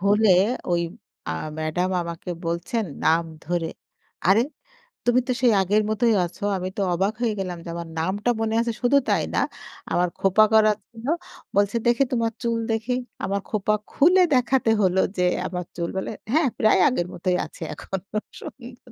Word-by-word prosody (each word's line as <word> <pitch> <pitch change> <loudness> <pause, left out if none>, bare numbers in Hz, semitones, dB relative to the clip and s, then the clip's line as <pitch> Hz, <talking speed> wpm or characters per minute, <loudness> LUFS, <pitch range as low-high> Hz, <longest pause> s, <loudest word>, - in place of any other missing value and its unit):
হলে 205 +2 +4 0.4
ওই 170 - +2 0.5
আ - - 0 0.3
ম্যাডাম 165 +4 -1
আমাকে 170 +1 -6
বলছেন 170 +7 -1 0.2
নাম 165 +1 +4 0.2
ধরে। 170 0 -1 0.6
"আরে 200 +4 +6 0.7
তুমি 245 +1 +4
তো 255 - +1
সেই 245 -3 +5
আগের 205 +3 +2
মতোই 230 +1 +2
আছো" 175 - -10
আমি 185 0 -3
তো 200 - 0
অবাক 195 +4 +1
হয়ে 230 -3 +1
গেলাম 185 -2 -3
যে - - -6
আমার 170 -1 -5
নামটা 195 +8 -1
মনে 220 0 0
আছে 235 0 -1
শুধু 250 +3 +4
তাই - - +3
না। - - +3 0.5
আমার 180 0 +2
খোপা 195 +3 +5
করা 215 -1 +6 0.2
ছিল। 230 0 -12 0.5
বলছে 200 +3 +2
দেখি, 240 +3 +3
তোমার 230 -2 +1
চুল 230 -1 0
দেখি, 225 +2 -1 0.3
আমার 200 +1 0
খোঁপা 215 0 +1 0.2
খুলে 360 +6 +5
দেখাতে 255 -2 +3
হলো 190 0 +3 0.2
যে 180 - +2 0.2
আমার 180 +1 -4
চুল 170 -1 -2
বলে 190 - -2 0.2
হ্যাঁ 315 -1 +4
প্রায় 215 - +4
আগের 180 -10 0
মতই 180 +1 0
আছে - - -15
এখনো 195 +6 -6 0.2
সুন্দর 245 -1 -11
205 Hz, 170 wpm, -24 LUFS, 180-235 Hz, 0.7 s, আরে